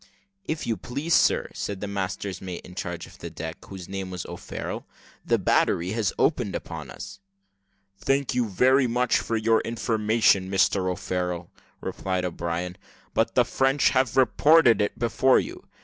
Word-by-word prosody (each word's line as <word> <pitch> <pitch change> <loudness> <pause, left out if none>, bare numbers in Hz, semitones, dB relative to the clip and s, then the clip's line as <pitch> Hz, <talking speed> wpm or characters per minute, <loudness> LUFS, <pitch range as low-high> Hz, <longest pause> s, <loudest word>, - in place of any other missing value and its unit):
"If 155 -3 -3
you 115 - -1
please, 140 +7 -3
sir," - - +3
said 100 -2 -4
the 105 - -4
master's 100 -1 -4
mate 90 -2 -7
in 90 - -11
charge 85 -2 -5
of - - -16
the - - -6
deck, 80 +1 -7
whose 95 -3 -9
name 95 -1 -5
was 90 -2 -5
O'Farrel, - - -6 0.4
"the - - +2
battery 85 +3 +2
has 110 -4 0
opened - - +1
upon - - -6
us." 100 0 -9 0.8
"Thank 135 0 +1
you 125 -3 0
very 130 +6 +4
much 125 +1 +2
for 115 - -2
your 110 +1 +3
information, 110 -4 +2
Mr 95 -1 +2
O'Farrel," 90 -1 -3 0.3
replied 95 -1 -2
O'Brien; 85 +1 -3 0.4
"but - - +1
the - - +5
French 135 +1 +2
have 130 -1 +1
reported 135 -3 +5
it 105 - -1
before 125 +2 +3
you. - - -7
100 Hz, 160 wpm, -25 LUFS, 90-125 Hz, 0.8 s, the